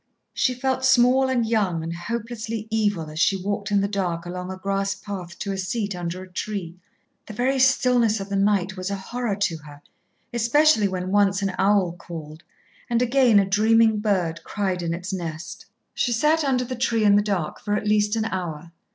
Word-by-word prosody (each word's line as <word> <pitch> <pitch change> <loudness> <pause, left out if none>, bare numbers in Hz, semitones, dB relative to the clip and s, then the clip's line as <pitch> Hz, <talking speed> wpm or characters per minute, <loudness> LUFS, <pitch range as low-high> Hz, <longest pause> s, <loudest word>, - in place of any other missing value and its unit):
She 255 - +1
felt 260 +1 -1
small 260 +1 +4
and 245 -3 +1
young 200 -7 0
and 165 +1 -4
hopelessly 225 +3 -5
evil 205 -7 0
as 155 - -6
she 195 +4 +3
walked 200 +2 -3
in 200 -1 +2
the 200 - +1
dark 180 -4 -2
along 180 +1 -5
a 190 - -6
grass 195 0 -1
path 185 -3 -7
to 200 - -4
a 195 - -3
seat 200 +1 -2
under 175 +1 -5
a - - -12
tree. 180 -2 -5 0.5
The 215 - -8
very 260 +3 +1
stillness 250 -4 +3
of 195 - -5
the 200 - -3
night 195 -2 +1
was 185 0 -4
a 200 - -2
horror 225 +2 -3
to 195 -5 -1
her, 150 -2 -13 0.5
especially 235 0 +4
when 185 -1 -4
once 200 -1 +2
an 195 -1 -1
owl 195 -3 +3
called, 165 -3 -9 0.5
and 235 -1 +2
again 250 -2 +4
a 200 - +5
dreaming 220 +2 +3
bird 180 -6 -1
cried 190 -3 -2
in 170 -1 -2
its 180 +3 -6
nest. 170 -1 -6 0.3
She 245 - 0
sat 300 +7 +2
under 260 -3 +1
the 255 +1 -5
tree 235 -2 0
in 205 -1 +5
the 205 - +5
dark 195 -7 -2
for 205 0 -2
at 210 - -2
least 210 0 +2
an 220 -1 0
hour. 170 -5 -4
200 Hz, 200 wpm, -23 LUFS, 180-230 Hz, 0.5 s, a